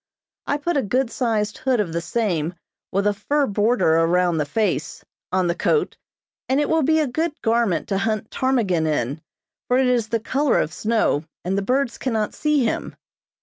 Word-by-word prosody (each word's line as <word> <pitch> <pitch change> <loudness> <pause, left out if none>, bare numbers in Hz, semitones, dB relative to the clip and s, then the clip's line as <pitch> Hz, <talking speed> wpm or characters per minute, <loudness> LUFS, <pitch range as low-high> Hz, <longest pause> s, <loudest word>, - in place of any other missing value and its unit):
I 285 - +1
put 310 +2 -1
a - - +3
good 250 +3 0
sized 220 -5 -1
hood 260 -3 +1
of 180 -6 -1
the 170 - -1
same, 175 -6 -1 0.4
with 200 +2 0
a 205 - +3
fur 280 +9 0
border 205 -6 +2
around 170 0 +2
the 150 - -1
face, 165 -5 -1 0.3
on 185 0 +2
the 170 - +1
coat, 440 - 0 0.5
and 265 +2 +3
it 295 - 0
will 320 0 +3
be 315 +2 +3
a 310 - +2
good 305 +4 -2
garment 225 -5 +1
to 195 -1 0
hunt 215 0 -2
ptarmigan 210 -12 +1
in, 145 0 -1 0.5
for 250 - +3
it 265 - +3
is 245 -3 +2
the 230 - 0
color 270 +5 +1
of 155 - -1
snow, 215 -7 +1 0.2
and 185 +2 0
the 200 - +1
birds 255 +4 0
cannot 220 -5 -1
see 300 -3 +1
him. 225 - -2
220 Hz, 190 wpm, -22 LUFS, 180-265 Hz, 0.5 s, a